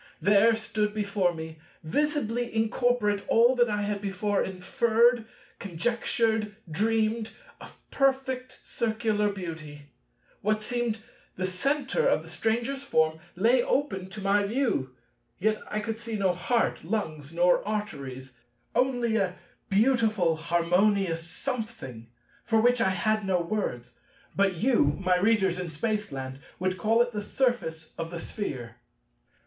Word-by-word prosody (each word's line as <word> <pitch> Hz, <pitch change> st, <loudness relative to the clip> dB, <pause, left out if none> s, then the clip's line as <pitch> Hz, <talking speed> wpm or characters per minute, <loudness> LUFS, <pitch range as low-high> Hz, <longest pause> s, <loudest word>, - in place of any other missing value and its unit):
There 210 Hz, +3 st, +5 dB
stood 215 Hz, -1 st, -2 dB
before 200 Hz, -3 st, +1 dB
me, 160 Hz, -1 st, -8 dB, 0.2 s
visibly 245 Hz, -, 0 dB
incorporate, 225 Hz, -2 st, +1 dB
all 240 Hz, +3 st, +5 dB
that 240 Hz, -1 st, +3 dB
I 210 Hz, -1 st, -1 dB
had 205 Hz, -1 st, -2 dB
before 200 Hz, +1 st, 0 dB
inferred, 225 Hz, +5 st, +2 dB, 0.3 s
conjectured, 220 Hz, +3 st, 0 dB
dreamed, 220 Hz, +5 st, 0 dB, 0.3 s
of -, -, -12 dB
perfect 260 Hz, -2 st, 0 dB
Circular 220 Hz, -2 st, 0 dB
beauty. 155 Hz, -6 st, -8 dB, 0.5 s
What 215 Hz, +1 st, +1 dB
seemed 235 Hz, -1 st, -2 dB, 0.3 s
the 185 Hz, -, -2 dB
centre 280 Hz, -, 0 dB
of -, -, +2 dB
the -, -, -11 dB
Stranger's 235 Hz, +5 st, -1 dB
form 160 Hz, -11 st, +1 dB, 0.2 s
lay 235 Hz, +7 st, +4 dB
open 195 Hz, -10 st, -1 dB
to 205 Hz, +2 st, -8 dB
my 200 Hz, +1 st, +3 dB
view: 200 Hz, -, -1 dB, 0.4 s
yet 215 Hz, +2 st, 0 dB
I 215 Hz, -, -1 dB
could 220 Hz, +1 st, -4 dB
see 230 Hz, -1 st, -4 dB
no 195 Hz, -3 st, +2 dB
heart, 230 Hz, +7 st, 0 dB
lungs, 160 Hz, -6 st, -3 dB
nor 175 Hz, +1 st, +3 dB
arteries, 135 Hz, -12 st, -5 dB, 0.4 s
only 245 Hz, -2 st, +1 dB
a 185 Hz, -3 st, 0 dB, 0.3 s
beautiful 215 Hz, -5 st, +3 dB
harmonious 175 Hz, +2 st, +2 dB
Something—for 220 Hz, -, -4 dB
which 245 Hz, +1 st, +3 dB
I 190 Hz, -, +4 dB
had 215 Hz, +3 st, +1 dB
no 190 Hz, -2 st, +1 dB
words; 145 Hz, -, -3 dB, 0.4 s
but 195 Hz, -1 st, +2 dB
you, 170 Hz, -, +2 dB
my 185 Hz, -1 st, +2 dB
Readers 190 Hz, -2 st, +2 dB
in 180 Hz, -1 st, -4 dB
Spaceland, 150 Hz, -7 st, -3 dB, 0.2 s
would 185 Hz, 0 st, -1 dB
call 225 Hz, +6 st, +4 dB
it 240 Hz, -, -6 dB
the 210 Hz, -2 st, -3 dB
surface 205 Hz, -10 st, -1 dB
of 165 Hz, 0 st, -3 dB
the 175 Hz, -, -6 dB
Sphere. 130 Hz, -, -5 dB
210 Hz, 130 wpm, -27 LUFS, 175-230 Hz, 0.5 s, There